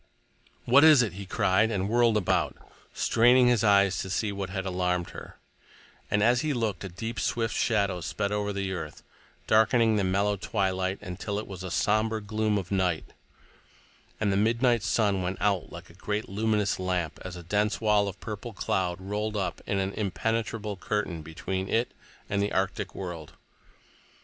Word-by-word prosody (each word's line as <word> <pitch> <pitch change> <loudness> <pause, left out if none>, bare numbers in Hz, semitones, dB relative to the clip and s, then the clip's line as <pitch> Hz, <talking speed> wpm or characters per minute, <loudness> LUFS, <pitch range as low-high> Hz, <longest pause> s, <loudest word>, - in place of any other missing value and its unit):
"What 135 +5 +6
is 155 -5 +8
it?" 105 -6 -3
he 100 +1 -8
cried, 100 +3 +2
and 100 -3 -1
whirled 115 0 +3
about, 100 - 0 0.3
straining 125 +2 +4
his 120 -3 +3
eyes 100 -2 +4
to 95 - -4
see 105 +3 -1
what 100 -1 -4
had 95 0 -4
alarmed 90 -1 -1
her; - - -10 0.7
and 105 0 +2
as 120 +2 +4
he 155 -1 0
looked, 110 -7 -2
a 95 - -5
deep, 115 +6 -5
swift 115 -1 -1
shadow 100 -5 +1
sped 100 +4 -2
over 105 0 -1
the 100 -1 -3
earth, 80 -5 -7 0.4
darkening 110 0 +4
the 100 - +1
mellow 100 +2 +1
twilight 95 -2 -1
until 100 +2 -4
it 105 - -3
was 95 -2 -7
somber 110 +3 +1
gloom 110 0 -1
of 95 -2 -5
night—and 95 +2 -5
the - - +1
midnight 115 +3 +2
sun 105 -3 +1
went 90 +1 -2
out 100 -1 0
like - - -10
a 90 - -20
great, 105 +1 -2
luminous 105 -1 0
lamp 90 -4 -2
as 95 -1 -7
a 90 - -9
dense 105 +4 0
wall 105 -2 +3
of 100 0 -6
purple 110 +1 -6
cloud 90 -2 -1
rolled 105 +3 -3
up 95 -2 -3
in 100 - 0
an 95 0 -1
impenetrable 110 +1 -2
curtain 95 -4 -2
between 95 +5 -4
it 115 +2 +1 0.4
and 100 0 0
the 100 - 0
arctic 95 0 -2
world. 85 -5 -7
100 Hz, 170 wpm, -27 LUFS, 95-110 Hz, 0.7 s, is